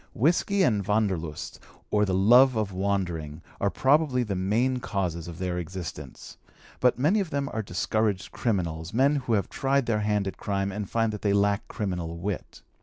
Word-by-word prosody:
Whisky 180 - +2
and 105 - +2
Wanderlust, 95 -8 -1 0.3
or 105 0 +3
the 95 - -1
love 120 +7 +6
of 105 -3 -1
wandering, 85 -5 -2 0.2
are 100 - +1
probably 135 +1 +2
the 105 -4 -3
main 110 +8 +1
causes 90 -8 -3
of 85 -2 -8
their 90 -1 -2
existence; 80 -6 -7 0.4
but 125 -1 +3
many 155 +12 +3
of 190 -5 -2
them 140 -1 -1
are 110 - -1
discouraged 100 0 -1
criminals, 90 -4 -2
men 140 +4 +4
who 125 -4 -2
have 100 -3 +1
tried 135 -1 0
their 110 -2 +1
hand 105 -1 0
at 95 - -5
crime 100 -1 -2
and 100 0 -5
find 115 -1 0
that 105 - -6
they 100 -1 +1
lack 100 0 +1
criminal 90 -5 -4
wit. 95 +2 -5
100 Hz, 180 wpm, -27 LUFS, 90-120 Hz, 0.4 s, love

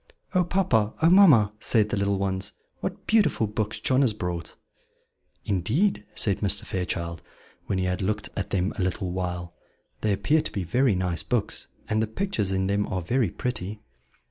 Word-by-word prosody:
"Oh, 185 -1 +4
papa! 130 - +1
oh, 160 - +5
mamma!" 145 - +7
said 110 -1 +2
the - - 0
little 100 0 +1
ones, 95 +1 -2 0.3
"what - - -5
beautiful 215 - +3
books 105 +1 -3
John 130 +1 +2
has 125 -6 +3
brought!" 90 -5 -4 0.9
"Indeed," 105 - +1
said 100 -3 +1
Mr. 100 -1 +1
Fairchild, 85 -2 -3 0.5
when 95 - 0
he 95 - 0
had 90 +2 -1
looked 105 +2 -1
at 100 - -3
them 95 +1 0
a - - +1
little 90 0 -2
while, 90 -1 -4 0.5
"they 110 - +1
appear 150 +10 +2
to 155 - -4
be 100 - -3
very 120 +5 +2
nice 90 -3 -1
books, 105 +7 -2 0.2
and 110 0 +1
the 110 - 0
pictures 110 - -1
in 95 0 0
them 100 +1 0
are 95 - -2
very 120 +2 +1
pretty." 105 -2 -4
100 Hz, 175 wpm, -26 LUFS, 95-115 Hz, 0.9 s, mamma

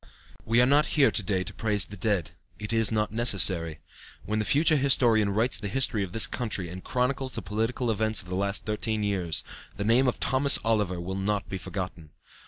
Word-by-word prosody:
"We 115 +2 +2
are - - +4
not 145 +3 +3
here 140 -2 +5
to - - +3
day 95 -1 -1
to - - -6
praise 105 -3 0
the 105 - -10
dead; 100 -3 -1 0.3
it 105 +1 -4
is 115 -2 +1
not 105 -1 -1
necessary. 95 -8 +2 0.4
When 105 +2 -2
the 105 - -2
future 155 - +3
historian 120 -6 +3
writes 110 +3 0
the 105 - -5
history 110 -2 0
of 95 - -7
this 115 +3 +6
country 105 -8 -3
and 90 +2 -9
chronicles 130 +1 -2
the - - -5
political 115 +3 -2
events 110 0 +1
of 90 - -8
the 90 - -5
last 100 +1 -1
thirteen 110 0 -2
years, 95 -6 -1 0.3
the - - -4
name 120 +4 +3
of 125 - -1
Thomas 140 +1 +4
Oliver 105 -6 0
will 90 +2 -5
not 100 +1 -2
be 95 - -6
forgotten. 90 -4 -7
105 Hz, 205 wpm, -26 LUFS, 95-120 Hz, 0.4 s, this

